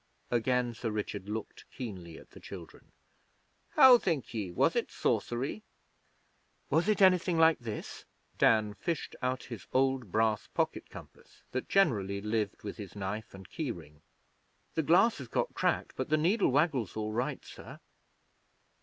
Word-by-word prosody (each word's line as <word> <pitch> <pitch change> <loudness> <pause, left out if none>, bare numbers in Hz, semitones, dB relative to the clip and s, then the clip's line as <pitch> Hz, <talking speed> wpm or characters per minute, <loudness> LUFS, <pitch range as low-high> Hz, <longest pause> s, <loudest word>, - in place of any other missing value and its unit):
Again 120 0 +1
Sir 115 0 -4
Richard 105 -2 -4
looked 110 0 -6
keenly 90 - -7
at - - -15
the - - -13
children. - - -11 0.8
'How 260 -4 +9
think 160 - -2
ye? 105 -5 -3
Was - - +2
it - - 0
sorcery?' 130 - -1 1.1
'Was 170 +6 +2
it 210 -2 +3
anything 180 -2 +4
like 160 0 +5
this?' 110 -4 -7 0.3
Dan 110 -2 +4
fished 165 +8 -4
out 130 0 -1
his 115 -5 -9
old 130 -5 +1
brass 110 0 +1
pocket - - -2
compass, - - -14
that 130 - -3
generally 105 - +2
lived 105 0 -2
with 105 - -6
his 105 -4 -9
knife 100 +1 -5
and 95 -1 -11
key 155 -5 -4
ring. 75 -7 -9 0.7
'The 160 - +1
glass 180 +6 +4
has 130 - -7
got - - -1
cracked, - - 0
but - - -3
the 155 - +3
needle 185 +8 +2
waggles 135 - +1
all 110 0 -2
right, 120 +4 -2
sir.' - - -11
120 Hz, 155 wpm, -31 LUFS, 105-155 Hz, 1.1 s, How